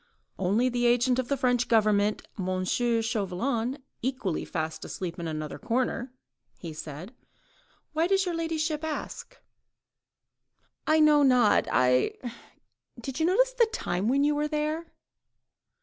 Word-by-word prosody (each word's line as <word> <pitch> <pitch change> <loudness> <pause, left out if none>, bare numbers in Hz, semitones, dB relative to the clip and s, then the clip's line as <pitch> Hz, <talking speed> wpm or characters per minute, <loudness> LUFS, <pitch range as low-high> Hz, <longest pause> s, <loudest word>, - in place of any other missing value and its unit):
"Only 200 +7 +2
the 245 -1 +1
agent 245 +1 +3
of 255 - -1
the 280 - 0
French 245 -1 +1
Government, 210 -2 +2 0.2
M. 185 0 -1
Chauvelin, 230 +3 -1 0.2
equally 245 -9 -2
fast 160 -1 -4
asleep 175 -2 -5
in 170 - -4
another 155 -1 -5
corner," 245 +1 -1 0.5
he 165 -3 -7
said. 155 - -8 0.8
"Why 320 +2 +2
does 390 +1 +2
your 355 - -2
ladyship 320 -2 -2
ask?" 315 +10 -5 1.5
"I 310 0 +4
know 300 -1 +6
not... 250 -5 +4
I... 125 +1 +3 0.8
Did 260 +4 -5
you 320 - +3
notice - - +3
the 475 -2 +4
time 195 - -2
when 275 +4 +3
you 295 +1 +3
were 295 +1 0
there?" 305 +2 -2
245 Hz, 135 wpm, -28 LUFS, 195-300 Hz, 1.5 s, know